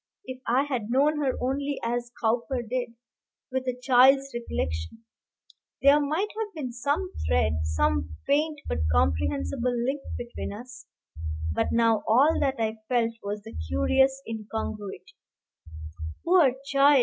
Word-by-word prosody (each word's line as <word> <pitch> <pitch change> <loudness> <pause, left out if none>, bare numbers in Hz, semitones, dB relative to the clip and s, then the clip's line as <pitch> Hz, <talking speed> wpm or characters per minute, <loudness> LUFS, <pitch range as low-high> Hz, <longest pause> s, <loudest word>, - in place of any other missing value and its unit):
If 260 0 -7
I 255 +4 +3
had 250 -7 -3
known 290 +5 +3
her 270 -3 +1
only 280 +2 -1
as 240 +1 -2
Cowper 240 +1 0
did 245 0 -3 0.6
with 260 0 -2
a 250 0 -2
child's 270 +1 +5
recollection 90 - -4 0.8
there 280 +2 +7
might 310 +8 0
have 420 -3 -4
been 270 -6 -4
some 290 +10 -1
thread, 80 -1 +2
some 75 0 0
faint 300 +1 +1
but 80 - -1
comprehensible 85 - +1
link, 275 +2 -1 0.2
between 240 0 -5
us; 245 +3 -10 0.7
but - - 0
now 230 -2 +3
all 270 +8 +4
that 275 -2 +1
I 220 -1 -1
felt 235 -2 +2
was 205 +1 -4
the 225 - -10
curious 265 - +1
incongruity. 215 -2 -5 1.1
Poor 335 -8 +5
child! 280 0 +5
245 Hz, 135 wpm, -27 LUFS, 215-275 Hz, 1.1 s, there